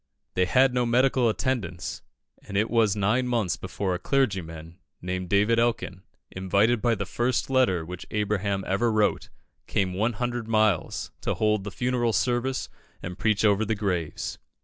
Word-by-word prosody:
They 90 - +2
had 130 +7 +4
no 125 -1 +1
medical 125 0 +3
attendance, 110 -8 -2 0.4
and 100 - -5
it 110 +3 +1
was 110 -4 +3
nine 110 +5 +1
months 115 -7 0
before 95 0 -3
a 90 - -3
clergyman, 90 - -2 0.2
named 90 0 -4
David 105 +4 +3
Elkin, 115 -6 -1 0.3
invited 100 +5 +1
by 120 -2 +2
the 100 -1 -3
first 120 +5 -1
letter 110 -11 +2
which 90 +1 -8
Abraham 100 -2 -1
ever 110 +5 +1
wrote, 110 -1 +1 0.4
came 95 -3 0
one 110 +6 0
hundred 120 0 -3
miles 110 -5 +1
to - - -1
hold 105 -2 +1
the - - -3
funeral 120 0 0
service 125 +5 0 0.4
and 90 +2 -6
preach 110 0 +2
over 105 0 +3
the 110 +1 -1
graves. 90 -7 -3
105 Hz, 160 wpm, -26 LUFS, 95-120 Hz, 0.4 s, had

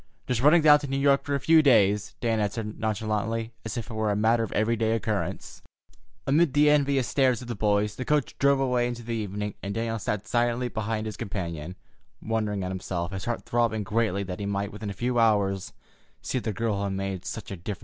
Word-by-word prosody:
"Just 125 -2 -1
running 155 +4 +6
down 150 -1 +8
to 145 - -6
New 135 0 -1
York 140 0 +3
for 145 - -1
a - - 0
few 160 +3 +5
days," 105 -7 +3
Dan 115 -2 +1
answered 105 +1 -3
nonchalantly, 110 +1 -2
as 110 0 -5
if 115 0 -5
it - - -6
were 110 -1 0
a 100 - +1
matter 110 +3 +3
of 115 - -3
every 110 +2 +2
day 110 0 +1
occurrence. 110 -2 -3 0.6
Amid 150 +1 +3
the 150 0 +5
envious 140 -4 +2
stares 130 -3 +2
of - - -10
the 120 - -3
boys, 105 0 +1
the 130 - -3
coach 150 +2 0
drove 140 0 +4
away 125 -2 +1
into 120 -1 -5
the 115 +1 -4
evening, 105 -2 -3
and 100 0 -4
Daniel 115 0 -2
sat 105 0 -3
silently 120 +1 +1
beside 110 -1 -3
his 105 -2 -5
companion, 85 -4 -5 0.4
wondering 105 -3 -2
at 90 - -3
himself, 90 -1 -3
his 95 -1 -5
heart 120 -1 -2
throbbing 115 -2 +1
greatly 105 -1 0
that 90 -1 -6
he 100 - -3
might 100 0 -2
within 105 0 -6
a - - -4
few 120 +4 -1
hours 100 -4 +2 0.5
see 130 - -2
the 115 - -3
girl 110 -1 -1
who 100 - -2
had 100 - -2
made 95 -1 -3
such 105 +3 -6
a - - -3
difference - - -14
in 90 - -7
his 100 - -2
life. - - -29
110 Hz, 235 wpm, -26 LUFS, 100-120 Hz, 0.6 s, down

